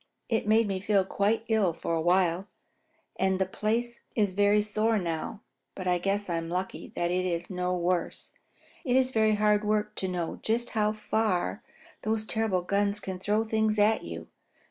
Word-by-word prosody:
It 225 -2 0
made 220 +1 +4
me 195 -2 -2
feel 200 -1 +2
quite 210 +4 0
ill 215 -6 +2
for 170 - -3
a 165 - +1
while, 180 +2 +2 0.7
and 190 0 +2
the 190 - +1
place 230 +5 -2 0.2
is 205 -4 +2
very 205 +1 +4
sore 215 +2 +1
now, 170 +2 -3 0.3
but 185 -1 -5
I 180 -1 +2
guess 200 +3 -1
I'm 165 -1 -2
lucky 185 +2 -4
that 175 0 0
it 185 0 0
was 170 +2 -3
no 180 0 -1
worse. 175 0 -1 0.5
It 250 -2 +1
is 260 0 +3
very 220 -2 +3
hard 210 0 +3
work 210 0 0
to 190 - -1
know 175 -3 -3
just 235 +2 -1
how 215 -1 +2
far 215 - -1 0.4
those 215 0 -1
terrible 220 -5 0
guns 200 +2 0
can 190 -2 -5
throw 210 +3 +1
things 220 -1 +1
at 210 +1 +3
you. - - -7
205 Hz, 180 wpm, -28 LUFS, 180-215 Hz, 0.7 s, made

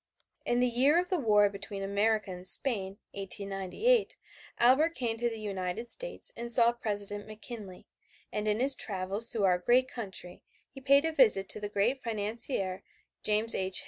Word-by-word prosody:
In 240 - +2
the 250 - +3
year 260 +6 +3
of 360 - -2
the 365 -3 0
war 210 -5 +4
between 200 0 -6
America 205 +1 0
and 180 0 -7
Spain, 200 -7 +1
1898, 200 - 0 0.4
Albert 290 +8 +4
came 235 -3 -2
to 240 +1 0
the 225 -1 -7
United 200 +2 -4
States - - -5
and 235 0 -5
saw 235 -1 +4
President 205 -3 -4
McKinley, 215 -3 -9 0.5
and 210 0 -2
in 210 +1 +1
his 270 +2 +6
travels 200 0 +1
through 225 -4 -2
our 180 -2 +3
great 250 +7 +3
country 190 -7 -7 0.3
he 270 - -12
paid 280 +3 +4
a 325 - +1
visit 215 -10 +4
to - - 0
the 205 0 -5
great 225 +7 0
financier 210 -3 -2 0.4
James 215 +2 0
J. 190 0 -2
215 Hz, 170 wpm, -30 LUFS, 200-245 Hz, 0.5 s, his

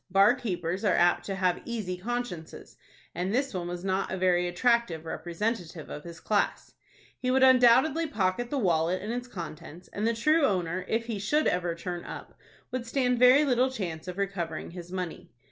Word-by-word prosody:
Bar 195 +4 +6
keepers 185 -7 -3
are 205 - +3
apt 175 0 +3
to 195 - -3
have 185 -2 +1
easy 215 -6 -3
consciences, 190 -4 -5 0.4
and 180 +2 -2
this 265 +3 0
one 175 -2 -3
was 175 +1 -5
not 190 0 0
a 190 - -2
very 180 -1 +2
attractive 180 -3 +1
representative 170 +1 -4
of 150 - -7
his 170 -1 -9
class. 205 +2 -1 0.5
He 255 - -1
would 260 +1 +4
undoubtedly 260 +5 +5
pocket 210 -1 -1
the 285 - -2
wallet 175 -4 +1
and 210 +4 -4
its 245 +1 -4
contents, 170 -4 -9
and 210 +2 -2
the 230 - +1
true 305 +7 +3
owner, 185 -5 0
if 225 +1 0
he 225 -3 -4
should 295 +10 +1
ever 175 -2 0
turn 175 0 -5
up, - - -9 0.4
would 245 -1 -4
stand 250 -1 +1
very 255 +4 +7
little 255 -1 +3
chance 180 -10 -5
of 180 0 -6
recovering 180 -6 -3
his 175 0 -9
money. 180 -3 -5
195 Hz, 185 wpm, -28 LUFS, 175-245 Hz, 0.5 s, very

